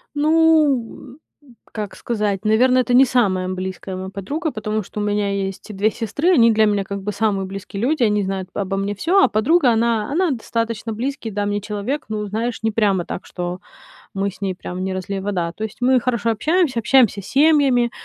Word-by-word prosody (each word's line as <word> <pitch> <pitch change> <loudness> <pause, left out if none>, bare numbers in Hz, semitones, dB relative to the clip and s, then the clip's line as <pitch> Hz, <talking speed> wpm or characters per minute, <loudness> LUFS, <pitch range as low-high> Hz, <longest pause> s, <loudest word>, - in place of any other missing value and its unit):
Ну, 295 -5 +2 0.2
м, 255 -5 -20 0.2
как 210 -3 -5
сказать, 210 -3 -2
наверно, 250 +4 +4
это 245 -1 0
не 265 +2 +7
самая 195 -7 +1
близкая 185 0 -5
моя 190 0 -6
подруга, 285 - -4
потому 215 -1 -3
что 210 - -8
у - - -1
меня 205 -1 0
есть 195 +1 -4
и - - -6
2 205 +3 +2
сестры, 235 - -1
они 230 -6 +5
для 220 0 +4
меня, 205 -1 +1
как 200 0 -6
бы, 210 +1 -4
самые 200 -3 0
близкие 195 +1 -7
люди, 270 +1 +1
они 210 -2 +2
знают 190 -1 -4
обо 195 -1 -2
мне 200 +1 -1
всё, 345 - +2
а - - +4
подруга- 250 +5 +3
она 225 0 +1
она 345 0 +1
достаточно 230 -2 -3
близкий, 240 -1 -4
да, 205 +1 -2
мне 205 0 -1
человек, 210 +8 -4
ну, 210 -1 -3
знаешь, 225 +4 -3
не 220 0 0
прямо 200 -5 +1
так, - - -6
что 180 0 -5 0.5
мы 195 0 -1
с - - -17
ней 190 -2 -2
прям 185 0 -6
не 190 0 -2
разлей 190 +1 -4
вода. 185 -4 -2
То 215 - -7
есть 215 - -9
мы 255 0 +4
хорошо 235 -2 -1
общаемся, 300 - +1
общаемся 230 -4 +3
семьями, 270 -1 +3
215 Hz, 205 wpm, -20 LUFS, 195-250 Hz, 0.5 s, не